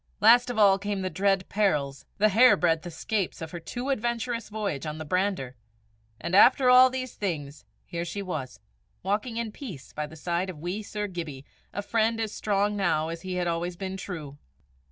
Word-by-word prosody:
Last 240 +4 +6
of 245 - -3
all 200 -2 +6
came 205 -1 -2
the 185 - -2
dread 195 +2 +1
perils, 145 -10 0
the 215 +1 +4
hairbreadth 180 -7 +4
escapes 185 +3 -2
of 160 -1 -6
her 175 - -6
too 245 +10 -5
adventurous 235 -2 -2
voyage 205 -9 -3
on 150 0 -4
the 155 - -6
brander; 180 -6 -1 0.6
and 170 - -5
after 250 +4 +7
all 255 +1 +8
these 255 -1 -4
things, 150 -7 -4 0.2
here 170 0 -4
she 185 +4 -4
was, 135 -10 -5 0.4
walking 210 +5 -1
in 230 -2 -2
peace 200 - -9
by 150 0 -3
the 155 - -12
side 175 +4 -2
of 180 - -7
wee 175 +7 -4
Sir 210 0 -4
Gibbie, 165 -8 -6 0.3
a 205 - -4
friend 225 +2 +1
as 220 -2 -2
strong 205 0 0
now 165 -5 +1
as 165 0 -6
he 185 0 -4
had 180 -1 0
always 170 +1 -2
been 190 0 -4
true! 160 -7 -7
190 Hz, 190 wpm, -27 LUFS, 165-215 Hz, 0.6 s, all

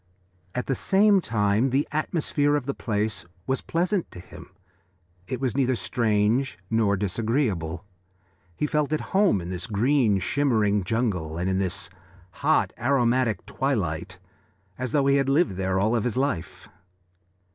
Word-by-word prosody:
At 125 - -2
the 135 - 0
same 200 +6 +3
time 105 0 +1
the 135 +3 +1
atmosphere 150 -1 0
of 145 -3 -1
the 140 - -2
place 105 -6 -2 0.2
was 130 0 -1
pleasant 180 +2 -1
to - - -11
him. 90 - -12 0.8
It 125 - -3
was 130 -2 -1
neither 130 -2 +2
strange 115 +1 0
nor 110 -3 +2
disagreeable. 100 - -1 0.7
He 150 - -1
felt 150 -1 0
at 155 - 0
home 195 - +4
in 85 +2 -6
this 90 +4 -4
green 115 0 +2
shimmering 105 -4 +1
jungle 90 -8 -1
and 90 +2 -1
in 95 0 +1
this 95 +2 -2 0.5
hot, - - +2
aromatic 125 -2 +1
twilight, 90 - -2 0.6
as 130 +1 -4
though 140 -2 +2
he 140 0 +4
had 135 -1 +1
lived 150 - +3
there 95 0 -1
all 110 +4 +2
his 120 +1 0
life. 120 - -2
115 Hz, 145 wpm, -25 LUFS, 100-140 Hz, 0.8 s, home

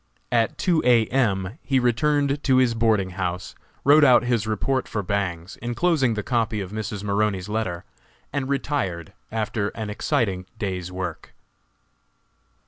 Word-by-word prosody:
At 115 -2 +1
two 175 -4 +2
A. 120 -3 +5
M. 105 - 0
he 135 0 0
returned 140 +4 +1
to 130 -2 +4
his 125 -2 +4
boarding 110 -5 +1
house, 90 0 -3 0.3
wrote 150 +2 +7
out 125 -4 +6
his 120 -3 0
report 130 +5 0
for 105 - -3
Bangs, 90 -2 -3
enclosing 130 0 +1
the 105 - -3
copy 115 -3 0
of 95 -2 -5
Mrs. 105 -1 -4
Maroney's 100 -2 0
letter, 95 -5 -2 0.5
and 140 -2 -2
retired 130 - -2 0.2
after 110 -1 -1
an 110 -2 -4
exciting 105 -6 -1
day's 90 -4 -3
work. 90 -3 -6
110 Hz, 140 wpm, -24 LUFS, 95-130 Hz, 0.5 s, wrote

